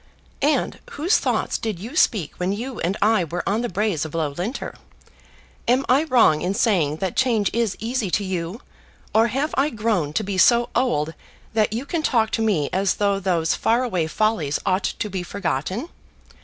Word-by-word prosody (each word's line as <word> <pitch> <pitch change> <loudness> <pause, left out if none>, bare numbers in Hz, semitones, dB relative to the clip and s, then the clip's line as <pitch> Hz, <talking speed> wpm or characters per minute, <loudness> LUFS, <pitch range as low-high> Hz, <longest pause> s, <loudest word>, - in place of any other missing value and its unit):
"And 300 +2 +1
whose 335 +8 +2
thoughts - - -1
did 220 -5 -3
you 225 - -8
speak 200 - +2
when 180 +1 0
you 240 +3 -5
and 185 +5 -1
I 215 -3 +3
were 170 +2 -4
on 210 +4 +1
the 240 - -2
braes 195 -4 0
of 155 0 -6
Loughlinter? 165 - -3 0.9
Am 255 +3 +3
I 275 +5 +4
wrong 230 - +4
in 185 +2 -1
saying 185 - +2
that 185 +2 -3
change 230 -6 +2
is 230 -3 0
easy 230 -2 -2
to 205 - 0
you, 185 +3 -4 0.5
or 225 +2 +5
have 270 +7 -1
I 275 +3 +2
grown 210 - -1
to 215 - 0
be 195 -2 -2
so 235 +2 +5
old 160 - +1 0.4
that 215 -2 +2
you 235 +5 -3
can 330 +3 -2
talk 230 -7 +2
to - - 0
me 195 -10 +1
as 195 +1 +1
though 200 -1 +1
those 175 -4 +1
far 235 +3 +1
away 180 -10 -1
follies 165 -5 0
ought 190 0 +1
to - - -2
be 190 -2 -4
forgotten? 185 - -3
210 Hz, 185 wpm, -22 LUFS, 180-235 Hz, 0.9 s, or